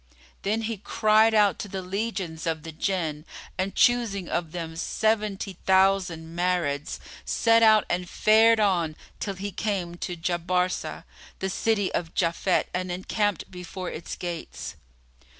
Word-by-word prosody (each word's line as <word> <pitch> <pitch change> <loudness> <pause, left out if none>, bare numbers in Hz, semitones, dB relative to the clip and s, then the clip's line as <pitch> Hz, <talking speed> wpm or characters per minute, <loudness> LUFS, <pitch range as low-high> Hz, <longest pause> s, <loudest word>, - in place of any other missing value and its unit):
Then 215 +3 0
he 225 0 -2
cried 215 +2 +3
out 205 -3 +4
to - - -4
the 190 -1 -5
legions 185 -4 -3
of 160 -2 -1
the 165 - -6
Jinn 160 -3 -2 0.3
and 190 +1 -2
choosing 225 -7 +2
of 170 -2 -2
them 165 -2 -5
seventy 210 0 -1
thousand 190 -4 +2
Marids, 175 -5 0 0.3
set 230 0 +3
out 215 -2 +6
and 180 0 -2
fared 225 +1 +5
on 175 -7 +2 0.2
till 200 -2 -3
he 200 +2 -5
came 185 -3 -2
to 175 0 -4
Jabarsá[FN#35] 180 +2 -1 0.3
the 190 - -2
city 205 -1 +1
of 165 -2 -3
Japhet 175 +1 +1
and 185 0 -2
encamped 200 +2 -1
before 180 0 -6
its 160 - -6
gates. 175 -2 -6
185 Hz, 140 wpm, -26 LUFS, 175-210 Hz, 0.3 s, out